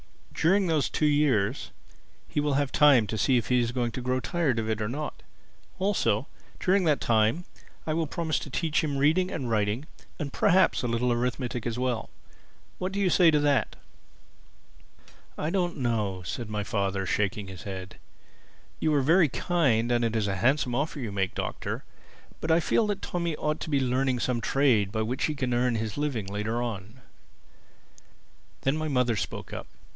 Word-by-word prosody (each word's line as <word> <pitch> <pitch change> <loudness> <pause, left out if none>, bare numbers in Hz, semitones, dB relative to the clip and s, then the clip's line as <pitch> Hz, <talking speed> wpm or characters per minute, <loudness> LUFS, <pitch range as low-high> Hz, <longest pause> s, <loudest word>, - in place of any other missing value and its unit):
During 190 +4 +3
those 160 -4 +1
two 155 - 0
years 140 -6 +2 0.6
he - - -2
will 145 -1 +1
have 140 -1 0
time 140 -7 +6
to 110 - -4
see 130 +5 +3
if 115 - -2
he 125 -1 +4
is 120 -1 0
going 120 -2 -1
to 130 - -5
grow 125 +1 0
tired 155 -4 0
of 110 -1 -1
it 110 0 -1
or 105 - -1
not. 150 +5 -5 0.6
Also 185 - +1 0.3
during 190 +1 +2
that 150 -3 +3
time, 115 +9 +2 0.4
I 155 - -1
will 160 0 0
promise 160 0 -1
to - - -8
teach 160 +4 0
him 145 -3 -1
reading 160 +7 +3
and 130 -10 -4
writing 105 +5 0 0.3
and 145 -5 -5
perhaps 185 0 +3
a 125 - -1
little 120 +1 +1
arithmetic 125 0 -2
as 120 0 -3
well. 125 -3 -1 0.7
What 185 +1 -2
do 200 - -3
you 190 -3 +2
say 175 -3 +6
to 155 - +4
that?" 145 -2 +1 1.6
"I 155 - -2
don't 175 -3 0
know," 105 -8 -1
said 105 +7 -5
my 105 -1 -2
father, 100 -2 -1
shaking 105 +2 -1
his 95 -2 -9
head. 95 -2 -7 0.8
"You 155 - +1
are 140 - +2
very 165 +2 +5
kind 125 -9 +1
and 120 0 +2
it 115 -1 0
is 110 -2 +1
a 95 -1 -1
handsome 130 +5 +2
offer 145 +4 -1
you 115 -6 -4
make, 95 -2 -1
Doctor. - - -4 0.6
But 160 - -4
I 160 +1 +5
feel 210 +6 +2
that 205 -1 -3
Tommy 170 -2 -2
ought 150 +1 -2
to - - -5
be 140 -2 +2
learning 130 0 +1
some 120 -2 0
trade 120 -9 +2
by 110 0 -1
which 125 +4 -1
he 155 - -2
can 130 -3 -1
earn 120 0 +2
his 110 -1 -3
living 140 -9 -1
later 105 +4 -2
on." 110 +1 -6 1.6
Then 135 +2 +1
my 155 0 -2
mother 125 -5 +1
spoke - - -5
up. - - -6
125 Hz, 190 wpm, -27 LUFS, 110-155 Hz, 1.6 s, time